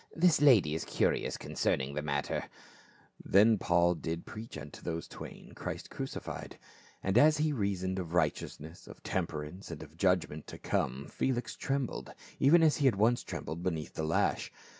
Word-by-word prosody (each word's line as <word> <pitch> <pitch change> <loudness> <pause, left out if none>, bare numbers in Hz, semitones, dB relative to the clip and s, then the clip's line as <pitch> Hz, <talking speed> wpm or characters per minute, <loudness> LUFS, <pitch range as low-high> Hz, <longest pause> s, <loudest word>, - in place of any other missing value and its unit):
"This 165 -3 +4
lady 115 - +6
is 80 - -2
curious - - 0
concerning 65 +2 -1
the 75 - -2
matter." 70 -2 -1 0.8
Then 105 +4 +6
did 110 - +2
Paul 85 0 +3 0.3
preach 110 -5 -8
unto 75 -1 -9
those 85 -1 -4
twain - - -10
Christ - - -6
cruci - - -4
fied. - - -7 0.5
And 95 +5 +4
as 155 +2 +6
he 155 0 +1
reasoned 95 -5 -1
of 85 -1 -4
righteousness, 80 0 -2
of - - -12
temper 75 -1 -2
ance 90 +6 -9
and 85 -3 -6
of 75 +1 -14
judgment 90 -5 +1
to - - -8
come, 65 +2 -1
Felix 125 - -2
trembled, 135 -4 -2 0.3
even 165 +5 +6
as 155 -2 +4
he 140 - +3
had 125 - +4
once 115 +4 +3
trembled 85 +2 -5
beneath 80 -4 -2
the 80 - -3
lash. 80 +1 +1
90 Hz, 170 wpm, -32 LUFS, 80-120 Hz, 0.8 s, lady